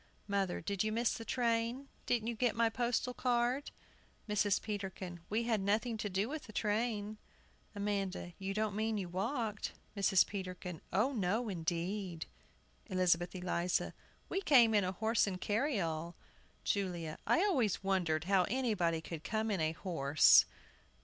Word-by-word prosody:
MOTHER. 195 -3 0
Did 200 +3 -1
you 215 - -1
miss 230 +1 +1
the 230 - -6
train? 235 +2 0 0.2
Didn't 235 -3 +1
you 235 - -1
get 235 0 +1
my 230 0 +3
postal 245 +1 0
card? 250 +3 0 0.6
MRS. 210 -1 +2
PETERKIN. 190 -4 -5
We 220 +3 +1
had 225 -3 +1
nothing 215 +4 +1
to 210 - -3
do 195 +3 0
with 300 +2 -5
the 215 - -11
train. 215 0 -1 0.6
AMANDA. 195 -3 -2
You 195 0 -3
don't 215 -1 0
mean 220 0 0
you 185 -3 -3
walked? 215 +3 -2 0.2
MRS. 195 -2 +4
PETERKIN. 180 -3 -6
O 215 +9 +2
no, 220 +2 0
indeed! 175 0 -2 0.6
ELIZABETH 180 -1 +2
ELIZA. 180 -1 -1 0.3
We 385 - -1
came 245 - +6
in 205 -2 +4
a 185 - 0
horse 220 +3 +2
and 185 -2 -3
carryall. 180 - -1 0.5
JULIA. 175 -6 -2
I 345 - +4
always 265 - +1
wondered 175 -5 +1
how 185 0 +3
anybody 205 -10 +1
could 160 -1 -7
come 220 0 -1
in 190 -5 0
a 155 0 +1
horse! 155 -5 +5
205 Hz, 150 wpm, -34 LUFS, 180-230 Hz, 0.6 s, came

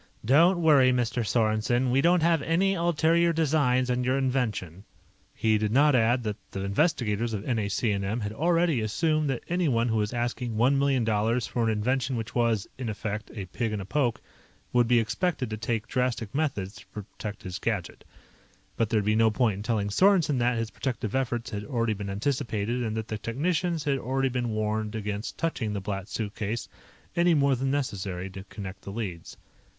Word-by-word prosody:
"Don't 165 - +5
worry, 145 -6 +5
Mr. 120 -1 0
Sorensen. 115 +3 +1
We 135 +2 +3
don't 170 +1 +4
have 165 -2 +3
any 180 +6 +2
ulterior 170 -1 +2
designs 140 -5 +2
on 125 0 0
your 130 +2 +1
invention." 115 - -1 0.5
He 110 -1 +1
did 105 -1 0
not 145 +4 +5
add 120 0 +3
that 105 -2 -3
the 95 - -5
investigators 115 - 0
of 100 - -5
NAC&M 105 -1 -1
had 105 0 -3
already 165 -1 +2
assumed 155 +7 0
that 135 - -2
anyone 140 -10 +1
who 110 - +1
was 105 -1 0
asking 120 -1 -2
one 130 +5 +3
million 135 -3 +2
dollars 110 +2 +1
for 120 -2 -1
an - - +2
invention 125 +5 0
which 115 -1 -4
was, 115 -4 +1
in 125 -3 -3
effect, 105 0 -4
a 100 -3 -4
pig 110 +4 -3
in 105 - -2
a 95 - -5
poke, 125 0 0 0.5
would 120 -1 +4
be 120 0 +4
expected 125 - -1
to 110 - -3
take 115 0 -2
drastic 120 -4 -1
methods 110 -10 -2
to 100 - -15
protect 105 0 -8
his 90 -1 -5
gadget. 105 -7 -3 0.7
But 115 -2 +1
there 110 - +2
would - - -6
be 105 +1 +2
no 110 0 +4
point 110 -2 +1
in - - -6
telling 105 -2 -1
Sorensen 170 - +3
that 120 0 +2
his 115 0 -2
protective 115 -5 -3
efforts 120 -3 -1
had 105 -1 -4
already 115 -3 0
been 100 -1 -5
anticipated 115 +1 -1
and 110 -2 -2
that 110 0 -3
the 110 - -3
technicians 160 - -1
had 140 -2 0
already 135 +2 0
been 120 -1 -2
warned 110 0 -2
against 105 0 -4
touching 115 -10 -2
the 100 - -2
Black 100 0 -4
Suitcase 110 +1 -3 0.5
any 170 -1 +4
more 140 -2 +3
than 135 +2 -1
necessary 95 -9 -3
to 95 0 -8
connect 100 -1 -8
the 100 - -8
leads. 100 -6 -6
115 Hz, 190 wpm, -27 LUFS, 105-135 Hz, 0.7 s, Don't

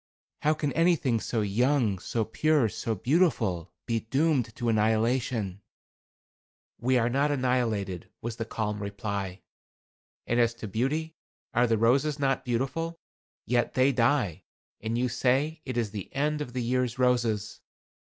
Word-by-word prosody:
How 155 +1 +3
can 145 -2 -2
anything 165 -8 +2
so 110 0 -1
young, 110 0 +2
so 110 +4 -1
pure, 150 +2 +2
so 110 +1 -3
beautiful, 115 - +1
be 115 -2 0
doomed 135 -1 0
to 120 - -3
annihilation?" 110 -2 +1 1.2
"We 130 +2 +2
are 115 -1 +2
not 140 +4 +2
annihilated," 120 - 0
was 115 0 -5
the 115 - -3
calm 105 -2 -3
reply. 100 -2 -4 0.8
"And 120 - +1
as 115 -1 +3
to 115 -2 -7
beauty, 145 +10 -1 0.4
are 120 +1 +3
the 115 -1 +2
roses 135 +7 +3
not 135 -2 0
beautiful? 135 +8 -2 0.5
Yet 120 0 +1
they 130 +2 +4
die 120 - +1 0.4
and 110 +1 -2
you 125 +1 +1
say 135 +6 +1
it 130 -2 -4
is 115 -4 0
the 100 -3 -6
end 150 +2 0
of 125 -5 -5
the 125 -1 -2
year's 125 0 0
roses. 120 -4 +1
120 Hz, 145 wpm, -28 LUFS, 110-135 Hz, 1.2 s, they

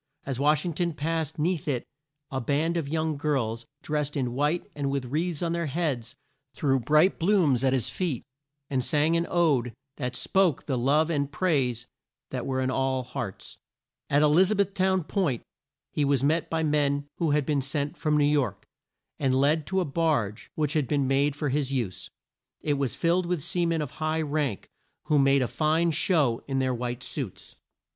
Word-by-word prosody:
As 135 -2 -3
Wash 150 +2 +3
ing 175 - -2
ton 170 +2 -1
passed 160 0 -2
'neath 160 0 -1
it 130 -5 -1 0.5
a 135 -1 -2
band 150 +6 0
of 160 -5 -2
young 155 -1 -1
girls, 130 -5 -1 0.2
drest 150 -1 -2
in 125 -3 -1
white 150 +6 0
and 140 -2 -2
with 135 -2 -1
wreaths 160 +5 -1
on 170 - 0
their 170 -1 -1
heads, 140 -6 -2 0.4
threw 135 -3 +2
bright 150 - +3
blooms 165 - +3
at 130 - +3
his 130 -3 +1
feet, 165 -10 -2 0.4
and 130 -2 -1
sang 155 +2 +2
an 170 0 +1
ode 140 -9 +2 0.2
that 125 -3 -3
spoke 185 0 +1
the 135 - -1
love 145 +6 +2
and 140 -2 -1
praise 135 -9 0 0.5
that 125 -2 -3
were 130 -1 0
in 130 0 0
all 130 -1 0
hearts. 120 -5 -6 0.5
At 145 +2 +4
E - - +6
liz 170 +6 +5
a 215 - +2
beth 200 -1 +1
town 190 -2 +2
Point 160 - -1 0.5
he 150 - 0
was 140 -2 +2
met 160 +4 +1
by 160 0 0
men 145 -2 +1
who 165 - +1
had 145 -1 +2
been 145 -1 +1
sent 140 +3 -2
from 150 -3 +1
New 145 - +4
York, 145 -2 0 0.5
and 135 -2 +2
led 145 +3 +2
to 190 0 +1
a - - 0
barge 140 -9 -1
which 150 -2 0
had 150 -5 +1
been 140 -1 +1
made 140 +2 +2
for 150 -1 -2
his 140 0 0
use. 120 -9 -3 0.5
It 150 - 0
was 135 -3 -1
filled 170 +1 +1
with 175 -5 -1
sea 175 -1 0
men 165 -2 0
of 145 - -6
high 155 0 -1
rank, 145 -7 -2 0.4
who 150 - +2
made 135 -1 +4
a - - 0
fine 160 +4 +1
show 145 -7 +2
in 135 -1 -1
their 130 -1 +1
white 120 +1 -4
suits. 130 -11 -6
145 Hz, 195 wpm, -27 LUFS, 135-160 Hz, 0.5 s, E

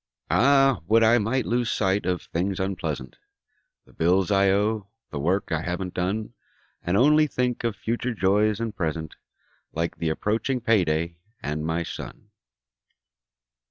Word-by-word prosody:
Ah, 135 -2 +4
would 115 +2 +5
I 115 +2 +5
might 115 +4 0
lose 120 0 0
sight 95 -2 0
of 90 -1 -1
things 95 +3 -2
unpleasant: 95 -9 -3 0.7
The - - -22
bills 90 +3 +2
I 100 0 +4
owe; 105 +1 +1 0.2
the 75 - -4
work 90 +8 0
I 80 -1 0
haven't 90 +1 -4
done. 105 +5 -2 0.5
And 90 +3 0
only 150 +5 +5
think 125 -3 -1
of 115 -3 -1
future 120 +3 -2
joys 105 +2 +2
and 115 -2 -3
present, 80 -3 -3 0.6
Like 85 +1 -2
the 80 - -1
approaching 110 +10 -1
payday, 85 -7 +1 0.3
and 75 +1 -3
my 80 +2 -1
son. 85 - -9
100 Hz, 145 wpm, -25 LUFS, 85-115 Hz, 0.7 s, would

